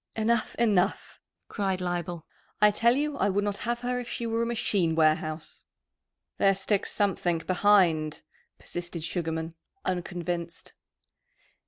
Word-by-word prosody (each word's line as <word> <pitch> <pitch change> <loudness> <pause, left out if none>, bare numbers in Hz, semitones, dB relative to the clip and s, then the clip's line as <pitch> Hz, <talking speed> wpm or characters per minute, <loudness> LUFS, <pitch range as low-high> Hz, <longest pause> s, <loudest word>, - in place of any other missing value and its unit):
"Enough, 225 +1 +1
enough!" 210 -6 +1 0.3
cried 195 -3 -1
Leibel. 175 -2 -3 0.3
"I 210 0 +6
tell 235 +3 +3
you 295 0 -1
I 200 - +2
would 200 +1 +1
not 205 -1 -2
have 240 0 -1
her 250 0 -1
if 245 - -6
she 235 - -4
were 230 0 0
a 235 - 0
machine 200 -8 +1
warehouse." 155 0 0 0.8
"There 195 0 +4
sticks 195 +1 0
something 185 -4 +1
behind," 180 -6 +3 0.3
persisted 175 -2 -5
Sugarman, 160 -1 -2 0.3
unconvinced. 175 -2 -3
190 Hz, 130 wpm, -28 LUFS, 170-220 Hz, 0.8 s, I